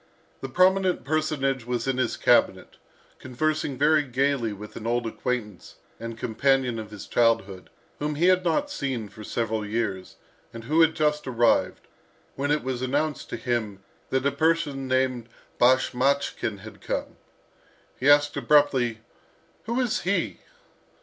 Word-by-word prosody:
The 135 - -6
prominent 185 +4 +3
personage 140 -4 -1
was 125 0 -2
in 130 -1 0
his 125 -3 0
cabinet, - - +2 0.4
conversing 145 +2 -2
very 150 +3 +4
gaily 135 -3 0
with 105 +1 -10
an 110 - -6
old 120 0 0
acquaintance 115 -4 -4 0.2
and 115 0 -6
companion 125 +1 +1
of 110 -1 -7
his 105 -2 -9
childhood, 100 -5 0 0.3
whom 150 0 -2
he 165 +4 +1
had 185 0 +4
not 280 - 0
seen 130 - -3
for 110 - -12
several 110 0 -2
years, 105 -3 -3 0.4
and 115 - -7
who 155 +7 +2
had 160 -1 +4
just 150 -2 0
arrived, 120 -2 +1 0.5
when 140 +1 -2
it 150 +1 +1
was 130 -1 -3
announced 145 +4 -1
to - - -4
him 110 -6 -3 0.3
that 130 0 0
a 140 - +3
person 155 -4 0
named 130 -2 0 0.3
Bashmachkin 130 -3 +1
had 110 +2 -12
come. - - -4 0.8
He 135 - +2
asked 145 0 +5
abruptly, 130 -6 +2 0.6
"Who 235 +3 -1
is 245 -4 0
he?" 175 - -1
130 Hz, 145 wpm, -25 LUFS, 115-150 Hz, 0.8 s, asked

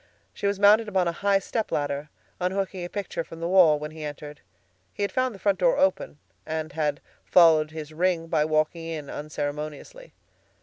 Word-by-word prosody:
She 200 - -2
was 200 -1 -1
mounted 210 +2 +6
upon 190 -4 +1
a - - +1
high 200 +3 +2
stepladder, 150 -9 -2 0.3
unhooking 190 0 -2
a 175 - -5
picture 195 -4 -4
from 165 0 -11
the 165 - -2
wall 175 -5 +6
when 150 +1 -6
he 155 0 -9
entered. 150 0 -8 0.5
He 205 - -2
had 200 - -1
found 255 -3 0
the - - -10
front 195 -1 0
door 175 -3 +3
open, 190 -5 +1 0.3
and 155 0 -4
had 150 -1 -1 0.2
followed 160 -3 +5
his 155 -1 -8
ring 170 0 0
by 160 -2 +1
walking 155 +2 0
in 155 -3 -6
unceremoniously. 150 - -6
165 Hz, 180 wpm, -26 LUFS, 155-195 Hz, 0.5 s, mounted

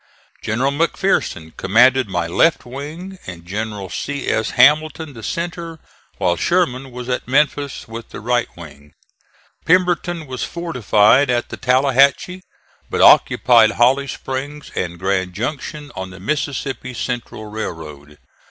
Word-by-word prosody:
General 125 +6 0
McPherson 145 - -1
commanded 125 +5 +4
my 90 -2 -1
left 125 - +2
wing 155 +9 -8
and 85 -2 -9
General 105 +1 -4
C. 140 -1 -4
S. 110 - 0
Hamilton 150 +3 +3
the 115 - -10
centre, 170 +4 -4 0.4
while 90 -1 +1
Sherman 135 - 0
was 125 0 -8
at 125 -1 -2
Memphis 140 +1 0
with 115 +1 -8
the - - -8
right 120 +2 0
wing. 75 -3 -13 0.7
Pemberton 175 -2 +1
was 130 -2 -6
fortified 130 - +2
at 120 -1 0
the - - -6
Tallahatchie, 135 +7 +2 0.5
but - - -2
occupied 115 -3 +6
Holly 135 +4 +3
Springs 140 +3 -6
and 85 -1 -3
Grand 95 0 -1
Junction 145 +5 -5
on 95 -1 -5
the 95 0 -12
Mississippi 135 +1 -3
Central 120 -2 -4
railroad. 80 -9 -7
125 Hz, 130 wpm, -19 LUFS, 105-145 Hz, 0.7 s, occupied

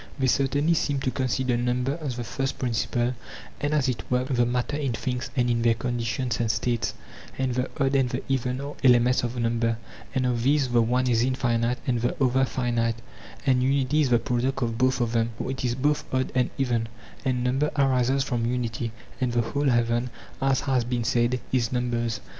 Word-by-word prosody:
They 135 - 0
certainly 140 +5 +2
seem 145 -3 0
to 130 - 0
consider 130 -1 0
number 125 +5 0
as 135 -5 -3
the 120 - -3
first 135 +3 -3
principle 120 0 0 0.5
and 145 - -1
as 145 -3 +2
it 125 -3 -1
were 125 0 +2
the 125 -3 +1
matter 125 +4 -1
in 140 -5 -1
things 125 +2 -3
and 125 -2 +2
in 120 -1 +1
their 115 -1 +3
conditions 120 +1 -2
and 115 -2 0
states; 120 +1 0 0.4
and 130 -1 0
the 125 +1 -1
odd 135 -1 +2
and 135 -2 +3
the 125 +1 -3
even 130 -1 -1
are 140 +1 -5
elements 125 0 +5
of 120 +1 -3
number, 115 -1 +1 0.4
and 130 -1 +1
of 120 -2 0
these 140 +1 +2
the 120 -1 +4
one 125 +3 +1
is 115 -2 +3
infinite 120 -1 +1
and 120 -3 0
the 120 - 0
other 130 0 +3
finite, 115 -1 0 0.5
and 130 -2 +3
unity 135 +3 +2
is 140 - +2
the 120 - +5
pro 120 +1 -1
duct 135 +2 0
of 115 -1 -2
both 130 0 +2
of 115 -1 0
them; 115 0 0
for - - -3
it 130 - -5
is 120 -1 0
both 145 +3 +1
odd 130 0 0
and 125 -1 +2
even, 120 -4 0 0.4
and 125 -2 0
number 135 +4 +1
arises 135 -1 +3
from 120 -4 -1
unity, 120 -2 -2 0.3
and 125 -2 +1
the 120 - +3
whole 140 +4 0
heaven, 120 0 +1 0.3
as 135 -1 +2
has 130 -3 +1
been 120 0 -1
said, 120 +2 +1
is 125 -3 +1
numbers. 120 -2 -1
125 Hz, 205 wpm, -26 LUFS, 120-130 Hz, 0.5 s, elements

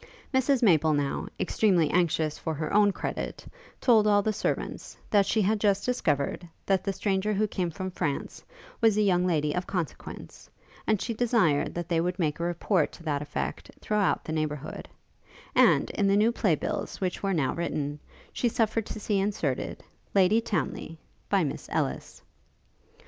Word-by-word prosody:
Mrs 260 0 +2
Maple 160 -6 +4
now, 145 -1 -1
extremely 180 -8 +2
anxious 160 -3 +1
for 160 -1 -3
her 155 +1 -3
own 205 0 +5
credit, - - -5 0.3
told 220 -4 +4
all 205 -1 +4
the 215 - 0
servants, - - -3
that 200 -2 +4
she 220 - +2
had 210 +3 +1
just 200 -1 +2
discovered, 170 - -1 0.2
that 190 -2 +2
the 195 - 0
stranger 195 +1 0
who 210 +2 +1
came 180 -3 -2
from 185 +3 -5
France, 155 -6 -3 0.4
was 220 -2 +4
a 215 - +4
young 180 -2 +3
lady 150 -4 +1
of 180 +2 -2
consequence, 175 -7 -6 0.4
and 215 -2 +2
she 230 - -2
desired 220 - +2
that 175 -1 -3
they 165 -1 +1
would 180 +1 -1
make 155 -4 -1
a - - -2
report 175 0 +1
to 170 - -13
that 145 -3 -1
effect 150 - -4
throughout 210 -3 +1
the 155 - -5
neighbourhood; 155 -1 -4 0.6
and, - - +4
in 200 - +1
the 195 +1 +4
new 220 +3 +4
play 200 -8 +2
bills - - -4
which 185 -2 -2
were 195 - 0
now 135 -5 +1
written, 150 -3 -3 0.3
she 240 - +1
suffered 225 -1 0
to - - -6
see 205 -1 0
inserted, 195 -9 -2 0.3
Lady 200 +4 +5
Townly 165 - -3 0.3
by 195 -3 +3
Miss 145 - -4
Ellis. - - -3
185 Hz, 170 wpm, -27 LUFS, 160-210 Hz, 0.6 s, own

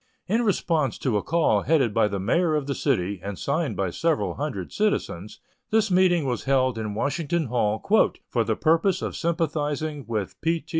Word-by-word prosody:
In 225 +5 +1
response 165 - 0
to 125 -5 -1
a - - 0
call 165 +6 +2
headed 135 -9 +2
by 105 - +3
the 100 -1 -3
mayor 155 - +1
of 150 -2 -1
the 140 - -2
city, 100 -10 -1
and 100 -1 -5
signed 140 - -1
by 95 -2 -1
several 165 - 0
hundred 135 - -5
citizens, 105 - -2 0.3
this 220 -2 +2
meeting 180 -4 +3
was 125 -2 -2
held 130 -3 +2
in 105 -2 -4
Washington 155 +6 -1
Hall 110 -3 0 0.5
"for - - 0
the - - -1
purpose 165 +4 +2
of - - -3
sympathizing 155 -3 -2
with 110 -4 -4
P. 165 0 0
T. - - -31
145 Hz, 185 wpm, -25 LUFS, 110-165 Hz, 0.5 s, by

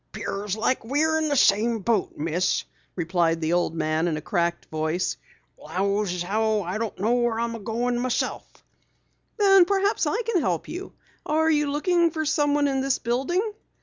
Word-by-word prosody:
"'Pears 200 +1 -4
like 240 +4 0
we 280 +7 0
is 315 0 +1
in 310 -1 0
the 290 - +1
same 225 -1 +3
boat, 220 -1 -1
Miss," 165 +4 0 0.3
replied 165 -1 +1
the 160 +1 0
old 175 -2 +1
man 155 +1 0
in 160 -3 -1
a - - -5
cracked 170 +2 -1
voice. 155 +3 -1 0.4
"'Lows 200 +1 -1
as 180 -1 -2
how 215 +2 0
I 185 +5 -3
don't 225 -2 -3
know 220 +5 +2
where 240 -2 +1
I'm 230 -2 -3
goin' 240 +3 -1
my 245 - -1
own - - -1
self." - - -2 0.9
"Then 390 -3 +6
perhaps 400 +2 +1
I 460 +3 0
can 425 -6 0
help 175 - -1
you. 365 +3 -7 0.3
Are 320 +1 +2
you 295 -1 +2
looking 340 +3 +2
for 315 -1 -3
someone 290 -1 +2
in 270 -1 0
this 270 0 +1
building?" 345 - -1
230 Hz, 185 wpm, -25 LUFS, 180-300 Hz, 0.9 s, Then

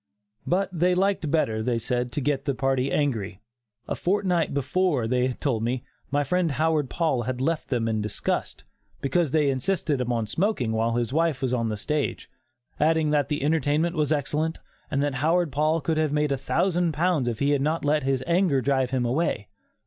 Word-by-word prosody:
But 190 +2 +1
they 180 +1 +2
liked 190 -4 +1
better, 115 -8 +1
they 120 +1 0
said, 125 +1 -2
to 145 - -1
get 140 0 -1
the 140 -2 0
party 135 0 0
angry. 110 -10 -1 0.5
A - - -1
fortnight 180 -3 0
before, 145 -1 +1
they 125 +1 +1
told 125 -4 -1
me, 120 +2 -1 0.3
my 145 +1 +1
friend 170 +1 0
Howard 155 -1 +1
Paul 160 -7 0
had 125 +2 -3
left 155 +4 -1
them 120 -4 0
in 110 -1 0
disgust, 105 0 -3 0.4
because 155 +4 +1
they 145 0 +2
insisted 145 0 -1
upon 120 -2 -1
smoking 155 - 0
while 115 +1 0
his 120 +1 -1
wife 160 -3 +1
was 130 -1 0
on 115 -2 0
the 105 - -3
stage, 150 +7 -2 0.5
adding 155 0 +2
that 145 -1 +1
the 150 -2 -1
entertainment 155 +2 +1
was 150 -2 0
excellent 155 +2 0 0.3
and 140 0 0
that 145 -1 0
Howard 165 +1 +2
Paul 155 +4 +1
could 160 0 -1
have 155 -2 +1
made 150 0 +1
a - - +2
thousand 175 +4 0
pounds 160 -4 +1
if 115 -2 -1
he 140 +4 +1
had 145 -2 +2
not 155 +2 0
let 150 +1 +2
his 135 -1 0
anger 170 -5 +2
drive 130 -1 +1
him 130 -1 0
away. 120 - -1
145 Hz, 195 wpm, -25 LUFS, 125-160 Hz, 0.5 s, they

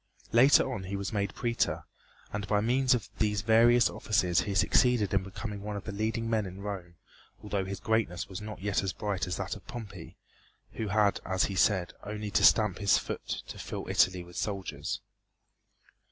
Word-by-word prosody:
Later 130 +2 +5
on 95 -5 -5
he 100 +2 -4
was 100 +2 -4
made 100 -2 -1
Prætor, 120 -1 -1 0.5
and 100 0 -3
by 105 - +2
means 125 +4 +3
of 105 -5 -4
these 105 -2 +1
various 115 +2 +5
offices 90 -5 +1
he 100 +2 -3
succeeded 105 +1 +3
in 95 - +3
becoming 100 +2 -6
one 105 0 -5
of 100 - -5
the 105 - -5
leading 110 +3 -2
men 110 -3 0
in 95 +2 -9
Rome 95 -4 -6 0.5
although 100 -2 -2
his 95 +1 -5
greatness 110 -4 0
was 95 +2 -7
not 105 -3 -8
yet 100 -1 +1
as 95 -2 -2
bright 100 -4 -2
as 90 - -3
that 100 0 -3
of 95 -2 -14
Pompey, 100 -8 -9 0.6
who 110 - -3
had, 100 -1 +2
as 95 0 0
he 100 - -1
said, 95 -2 +2
only 105 0 -5
to - - +2
stamp 105 -5 +5
his 100 -2 +4
foot - - -5 0.2
to - - -9
fill - - -6
Italy 90 -1 +2
with 90 0 -12
soldiers. 95 -8 -3
100 Hz, 190 wpm, -29 LUFS, 95-110 Hz, 0.6 s, Later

